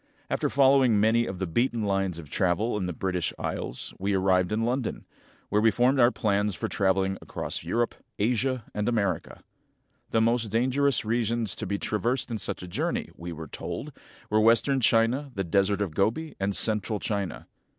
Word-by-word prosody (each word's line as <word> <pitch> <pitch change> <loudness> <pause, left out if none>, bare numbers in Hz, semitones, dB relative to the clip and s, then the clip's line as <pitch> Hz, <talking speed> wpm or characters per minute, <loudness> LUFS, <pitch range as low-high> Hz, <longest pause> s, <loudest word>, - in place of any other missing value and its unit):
After - - +1
following 135 -5 +4
many 115 +2 +3
of 95 - -5
the 95 - -2
beaten 120 +5 0
lines 95 -3 0
of 80 -3 -9
travel 95 +9 0
in 95 -3 -1
the - - -2
British 90 -1 -2
Isles 65 - -4
we 100 +1 0
arrived 95 -1 +2
in 110 +1 0
London, 125 +1 -2 0.4
where 105 +1 +2
we 115 - +5
formed 125 +5 +2
our 120 -1 +7
plans 105 -4 0
for - - -3
traveling 95 0 +1
across - - -4
Europe, 120 0 0 0.2
Asia, 125 +2 0
and 105 +2 0
America. 100 -5 -1 0.7
The 115 - +2
most 115 0 +2
dangerous 130 +4 +1
regions 115 -1 0
to 110 - -5
be 100 +2 -1
traversed 120 +6 -1
in 110 - -2
such 90 - -4
a - - -7
journey, 85 - -2
we 85 +1 -7
were 80 -1 -7
told, - - -6 0.4
were 110 0 +4
western 115 +5 +4
China, 120 +4 +2
the 95 - -1
Desert 100 +3 +1
of 95 -6 -2
Gobi, 115 - 0
and 100 0 0
central 110 -1 0
China. 100 -3 -3
105 Hz, 180 wpm, -27 LUFS, 95-120 Hz, 0.7 s, our